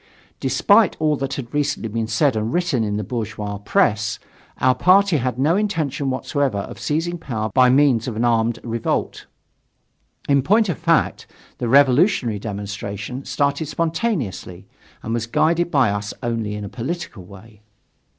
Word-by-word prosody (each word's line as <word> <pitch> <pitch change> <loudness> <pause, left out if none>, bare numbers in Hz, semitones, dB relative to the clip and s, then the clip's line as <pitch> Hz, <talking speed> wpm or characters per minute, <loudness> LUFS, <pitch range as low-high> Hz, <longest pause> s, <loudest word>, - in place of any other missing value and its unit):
Despite - - +3
all 155 -1 +2
that 135 0 -3
had 125 -2 -7
recently 145 -4 -1
been 110 +1 -3
said 115 +4 +2
and 110 +1 -1
written 170 -8 0
in 105 -1 -2
the 105 - -2
bourgeois 105 -2 -4
press, 105 +1 +1 0.4
our 130 0 +3
party 185 +5 +4
had 125 -2 -2
no 150 +6 +2
intention 160 -10 -1
whatever 135 -2 -1
of 100 - -6
seizing 165 +3 -2
power 110 -8 -4
by 130 -1 +5
means 130 -3 +3
of 120 - -4
an 115 +2 0
armed 115 0 +1
revolt. 115 -1 -3 1.0
In 140 -1 +3
point 210 - +3
of 175 - -2
fact, 165 -1 +1 0.3
the 120 - -2
revolutionary 135 - +4
demonstration 105 +4 -6
started 140 +2 -1
spontaneously, 155 - -3 0.4
and 115 - -3
was 115 -1 -2
guided 170 +8 +1
by 135 -9 +3
us 100 0 -4
only 115 -3 -2
in 105 0 -5
a - - -5
political 125 - -5
way. 100 +3 -15
125 Hz, 155 wpm, -21 LUFS, 110-150 Hz, 1.0 s, by